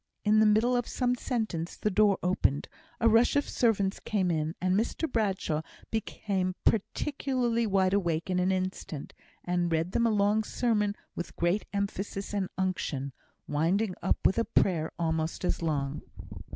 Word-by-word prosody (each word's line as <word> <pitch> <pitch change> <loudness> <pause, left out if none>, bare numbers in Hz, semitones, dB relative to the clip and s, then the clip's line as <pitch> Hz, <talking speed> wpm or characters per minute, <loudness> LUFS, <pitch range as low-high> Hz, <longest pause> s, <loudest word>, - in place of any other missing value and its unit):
In 215 +1 +5
the 220 - +6
middle 220 +4 +3
of 245 -1 0
some 250 -1 0
sentence 220 -10 -3
the 210 - 0
door 205 0 +4
opened, 180 -6 +1 0.3
a 230 - +4
rush 230 +4 +4
of 285 - +2
servants 200 -5 +1
came 190 -4 0
in, 155 0 -1
and 185 0 +1
Mr 230 +9 0
Bradshaw 195 - 0 0.3
became 195 -4 -2
particularly 240 0 0
wide 190 -2 +2
awake 170 -5 0
in 180 -1 0
an 180 +1 +2
instant, 185 -5 -3 0.3
and 175 -1 0
read 165 +2 0
them 235 +3 +2
a - - +3
long 210 +1 +2
sermon 210 -3 0 0.2
with 175 - -6
great 175 +5 0
emphasis 200 0 -3
and 195 -3 -1
unction, 180 -8 -2 0.3
winding 180 +7 +1
up - - +1
with 195 - +4
a - - +3
prayer 165 -4 +1
almost 160 +1 -1
as - - 0
long. 145 -3 -1
195 Hz, 160 wpm, -29 LUFS, 175-220 Hz, 0.3 s, the